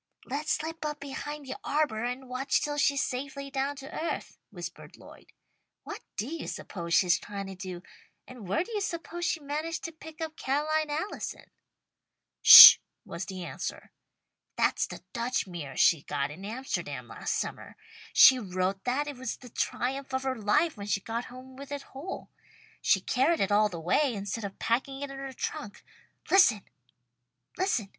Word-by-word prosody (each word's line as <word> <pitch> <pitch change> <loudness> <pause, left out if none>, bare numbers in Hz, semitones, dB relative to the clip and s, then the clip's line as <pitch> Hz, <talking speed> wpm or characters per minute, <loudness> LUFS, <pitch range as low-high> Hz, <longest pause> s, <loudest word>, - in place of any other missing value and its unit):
"Let's 290 +4 -2
slip 320 +1 -4
up 300 -1 -3
behind 285 +1 -6
the 265 - -6
arbour 280 -7 0
and 250 +2 -4
watch 255 +2 0
till 290 0 -3
she's 280 -1 +2
safely 275 +2 -5
down 275 +1 -1
to 275 0 -10
earth," 335 - -4
whispered - - -9
Lloyd. - - -16 0.5
"What - - -8 0.2
do 210 - -1
you 325 +3 -6
suppose 170 -3 -4
she's 180 -1 +4
trying 200 -1 -6
to 195 - -7
do, 185 -2 -7 0.4
and 245 -6 -11
where 200 - +1
do 465 - -12
you 420 -2 -2
suppose 345 -1 -4
she 325 -1 -1
managed 305 +3 -4
to 330 - -4
pick 320 0 -13
up 320 -1 -5
Ca'line 305 +3 0
Allison?" 315 +8 -5 0.9
"Sh!" - - +13 0.3
was 170 +3 -6
the 190 -2 -7
answer. - - -6 0.6
"That's - - +1
the - - -10
Dutch 240 +1 -1
mirror 165 -8 -8
she 160 - +5
got 140 0 -3
in 185 +6 -9
Amsterdam 250 +6 -4
last - - -3
summer. - - -5 0.4
She 260 -1 +8
wrote 190 -2 -2
that 260 +4 0
it 290 -3 -6
was 260 -2 -4
the 250 - -13
triumph 265 +3 -2
of 260 - -2
her 265 -1 0
life 295 +10 +1
when 200 0 -7
she 195 -1 +1
got 230 +4 -4
home 255 +1 -12
with 280 +1 -10
it 285 -1 -4
whole. 290 +8 -7 0.5
She - - +3
carried 295 +6 +1
it 195 - 0
all 210 +1 +4
the 175 -4 -7
way, 240 - +1
instead 205 +2 -4
of 195 - -7
packing 270 +4 -1
it 280 - -5
in 275 - -8
her 270 0 -6
trunk. 205 -5 -6 0.5
Listen! 270 - +5
260 Hz, 175 wpm, -28 LUFS, 205-295 Hz, 0.9 s, Sh